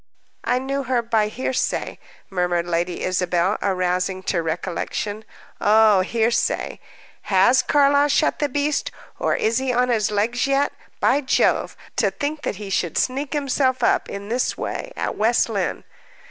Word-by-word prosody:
"I 245 Hz, +2 st, +1 dB
knew 275 Hz, +1 st, -2 dB
her 245 Hz, -1 st, +1 dB
by 225 Hz, -2 st, +1 dB
hearsay," 255 Hz, +4 st, -2 dB, 0.3 s
murmured 175 Hz, -2 st, 0 dB
Lady 175 Hz, +1 st, -2 dB
Isabel, 180 Hz, +1 st, 0 dB
arousing 185 Hz, 0 st, -1 dB
to 175 Hz, -2 st, 0 dB
recollection. 180 Hz, +5 st, -3 dB, 0.4 s
"Oh, 215 Hz, -1 st, +5 dB
hearsay! 225 Hz, +4 st, 0 dB, 0.5 s
Has 205 Hz, +7 st, +5 dB
Carlyle 285 Hz, 0 st, +4 dB
shot 300 Hz, +2 st, +1 dB
the 290 Hz, -, 0 dB
beast, 290 Hz, +2 st, 0 dB, 0.3 s
or -, -, +1 dB
is 230 Hz, +3 st, +1 dB
he 265 Hz, -1 st, -1 dB
on 250 Hz, +1 st, +1 dB
his 220 Hz, -4 st, +1 dB
legs 225 Hz, +6 st, 0 dB
yet? 275 Hz, +1 st, +1 dB, 0.3 s
By 280 Hz, +3 st, +3 dB
Jove! 260 Hz, -, +1 dB, 0.2 s
To -, -, +3 dB
think 295 Hz, +1 st, -4 dB
that -, -, -3 dB
he 200 Hz, 0 st, -7 dB
should 170 Hz, -3 st, -1 dB
sneak 270 Hz, +3 st, -1 dB
himself 270 Hz, -3 st, 0 dB
up, -, -, +2 dB
in 200 Hz, 0 st, -6 dB
this 245 Hz, +2 st, 0 dB
way, -, -, -4 dB
at -, -, -3 dB
West 230 Hz, +2 st, +2 dB
Lynne!" 200 Hz, -4 st, -2 dB
225 Hz, 150 wpm, -22 LUFS, 190-265 Hz, 0.5 s, Oh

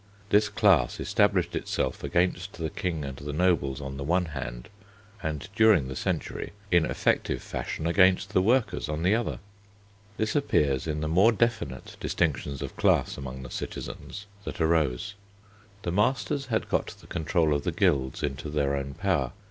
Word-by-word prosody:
This 105 Hz, 0 st, +4 dB
class 95 Hz, -, +3 dB
established -, -, +2 dB
itself -, -, -2 dB
against 90 Hz, +2 st, 0 dB
the 80 Hz, -2 st, -4 dB
King 80 Hz, -5 st, -2 dB
and 70 Hz, -1 st, -6 dB
the 75 Hz, +1 st, -5 dB
nobles 75 Hz, -5 st, +1 dB
on 70 Hz, -1 st, -6 dB
the 70 Hz, -, -4 dB
one 90 Hz, +5 st, +2 dB
hand, 60 Hz, -6 st, -6 dB, 0.5 s
and 80 Hz, -1 st, -3 dB
during 110 Hz, -12 st, +5 dB
the 65 Hz, -, -5 dB
century -, -, -3 dB, 0.2 s
in 85 Hz, -2 st, +4 dB
effective -, -, 0 dB
fashion 80 Hz, -, -4 dB
against 95 Hz, +2 st, +4 dB
the 95 Hz, -, +4 dB
workers 115 Hz, -, +1 dB
on 75 Hz, +2 st, -2 dB
the 95 Hz, +4 st, +4 dB
other. 115 Hz, +1 st, 0 dB, 0.8 s
This 110 Hz, 0 st, -1 dB
appears 75 Hz, -, +2 dB
in 75 Hz, -1 st, -2 dB
the 80 Hz, -, -1 dB
more 95 Hz, +9 st, +5 dB
definite 115 Hz, -, -1 dB
distinctions 70 Hz, -4 st, -1 dB
of -, -, -6 dB
class -, -, +2 dB
among 65 Hz, -1 st, -7 dB
the 60 Hz, -, -9 dB
citizens 105 Hz, -, -6 dB, 0.2 s
that -, -, -6 dB
arose. 80 Hz, +2 st, +1 dB, 0.7 s
The 85 Hz, -, -1 dB
masters 130 Hz, -, +1 dB
had 110 Hz, -3 st, -1 dB
got -, -, 0 dB
the -, -, -17 dB
control 80 Hz, -1 st, +1 dB
of 70 Hz, -1 st, -1 dB
the 90 Hz, -, 0 dB
guilds 75 Hz, -8 st, +1 dB
into 70 Hz, +1 st, -3 dB
their 70 Hz, -2 st, +1 dB
own 70 Hz, 0 st, -4 dB
power. 85 Hz, -11 st, 0 dB
80 Hz, 165 wpm, -27 LUFS, 70-100 Hz, 0.8 s, during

